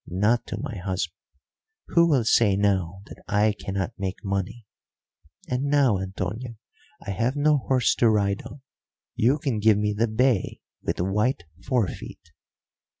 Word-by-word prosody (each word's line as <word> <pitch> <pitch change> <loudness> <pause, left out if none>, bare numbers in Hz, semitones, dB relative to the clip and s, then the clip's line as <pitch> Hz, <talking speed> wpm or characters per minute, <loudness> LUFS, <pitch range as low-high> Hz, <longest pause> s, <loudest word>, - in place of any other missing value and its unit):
Not 105 +6 +1
to - - -4
my 135 -6 -5
husband. 90 -2 -3 0.8
Who 170 0 +4
will 135 -6 +3
say 105 -3 +4
now 95 -2 0
that - - -13
I 105 +1 +2
cannot 95 +3 -3
make 95 0 -4
money? 100 +4 -3 0.8
And 125 +2 -1
now, 140 -8 +3
Antonio, 100 +6 -5 0.5
I - - -3
have 115 +7 0
no 145 0 +3
horse 130 -1 +2
to 115 - +4
ride 100 -2 +1
on, 140 - -12 0.5
you 125 +6 +2
can 135 -7 -2
give 105 0 +4
me 105 0 0
the 115 +3 +1
bay 115 -1 +1 0.2
with - - -3
white 105 +4 0 0.2
forefeet." 120 -7 -3
110 Hz, 150 wpm, -25 LUFS, 95-125 Hz, 0.8 s, Who